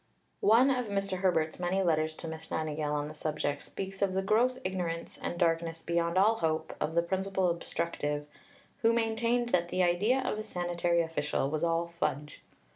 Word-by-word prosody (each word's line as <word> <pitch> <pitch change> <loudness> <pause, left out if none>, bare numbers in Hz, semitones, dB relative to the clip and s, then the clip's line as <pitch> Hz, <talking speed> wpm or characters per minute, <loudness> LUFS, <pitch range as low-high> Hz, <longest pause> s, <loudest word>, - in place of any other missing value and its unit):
One 240 +6 +5
of 250 -3 0
Mr. 195 -2 -1
Herbert's 165 -4 +1
many 185 +2 +1
letters 155 -2 +1
to 165 - -7
Miss 160 0 -7
Nightingale 155 -1 -2
on 145 0 -1
the 155 - -8
subject 150 -2 -2
speaks 195 0 -6
of 195 -2 +2
the 190 - +1
"gross 240 +6 +3
ignorance, 175 -3 -3
and 175 - -3
darkness 165 -1 0
beyond 170 +1 0
all 215 +4 +5
hope" 160 -3 -1
of 155 +2 -1
the 170 - +4
principal 190 0 0
obstructive, 150 -3 -2 0.6
who 230 0 +4
maintained 235 +1 +1
that 175 -4 +1
the 185 +1 +1
idea 200 +9 +3
of 215 - -1
a - - -3
sanitary 175 -3 0
official 150 -4 -1
was 155 +1 -1
all 165 0 +2
fudge. 150 +2 -2
175 Hz, 180 wpm, -30 LUFS, 160-195 Hz, 0.6 s, One